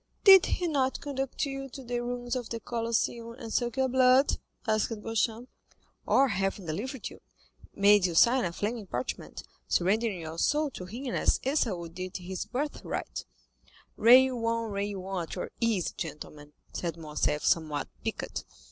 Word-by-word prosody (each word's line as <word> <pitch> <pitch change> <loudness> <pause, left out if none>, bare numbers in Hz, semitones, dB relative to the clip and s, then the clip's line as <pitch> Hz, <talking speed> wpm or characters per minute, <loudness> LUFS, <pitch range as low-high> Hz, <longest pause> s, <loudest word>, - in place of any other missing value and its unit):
"Did 385 -2 +9
he 360 - -1
not 270 -4 +1
conduct 270 -1 -2
you 270 -1 -5
to 270 +1 -9
the 245 0 -2
ruins 245 0 -3
of 245 -3 -4
the 230 - -4
Colosseum 230 0 -2
and 235 -3 -8
suck 240 +1 0
your 265 0 +3
blood?" 255 +1 +4 0.3
asked 215 -2 +1
Beauchamp. 225 +2 -1 0.6
"Or, 275 0 +4
having 195 -1 -1
delivered 225 - -4
you, - - -14 0.5
make 200 -1 +5
you 170 - -4
sign 245 +8 +5
a 175 - -1
flaming 210 +3 -3
parchment, 125 -5 -5 0.2
surrendering 200 +1 +1
your 160 +1 -6
soul 295 - +2
to 180 - -7
him 240 +7 -5
as - - +2
Esau 230 - 0
did 185 +3 -6
his 185 0 -5
birth 290 +4 -3
right?" - - -4 0.7
"Rail 250 +1 +6
on, 230 -1 -1
rail 200 -1 -3
on 190 -2 -2
at 165 - -6
your - - -5
ease, 225 -7 +1
gentlemen," 150 -1 -8 0.2
said 170 -2 -3
Morcerf, 150 -1 -1
somewhat 155 -4 +1 0.2
piqued. - - -4
230 Hz, 160 wpm, -29 LUFS, 185-255 Hz, 0.7 s, Did